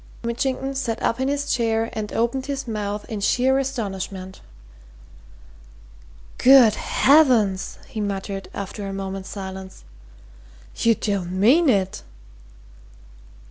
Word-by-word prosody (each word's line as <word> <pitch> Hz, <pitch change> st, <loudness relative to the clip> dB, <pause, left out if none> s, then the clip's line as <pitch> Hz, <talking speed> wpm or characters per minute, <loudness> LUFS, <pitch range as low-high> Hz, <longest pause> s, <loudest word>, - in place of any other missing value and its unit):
Mitchington 265 Hz, +3 st, -2 dB
sat 235 Hz, -4 st, -2 dB
up 230 Hz, -, 0 dB
in 260 Hz, -, 0 dB
his 285 Hz, 0 st, -1 dB
chair 225 Hz, -1 st, 0 dB
and 215 Hz, -2 st, -4 dB
opened 260 Hz, +3 st, -1 dB
his 275 Hz, -2 st, -4 dB
mouth 210 Hz, -2 st, -3 dB
in 215 Hz, -, -4 dB
sheer 255 Hz, +6 st, +2 dB
astonishment. 195 Hz, -7 st, -5 dB, 2.0 s
"Good 250 Hz, -4 st, +7 dB
heavens!" 245 Hz, -10 st, +3 dB
he 215 Hz, -, -5 dB
muttered 195 Hz, -1 st, -4 dB
after 200 Hz, +1 st, -6 dB
a 195 Hz, -, -5 dB
moment's 195 Hz, 0 st, -5 dB
silence. 190 Hz, -, -8 dB, 0.9 s
"You 230 Hz, -1 st, +3 dB
don't 195 Hz, -4 st, -2 dB
mean 275 Hz, -, +5 dB
it?" 195 Hz, -5 st, 0 dB
220 Hz, 110 wpm, -22 LUFS, 195-260 Hz, 2.0 s, Good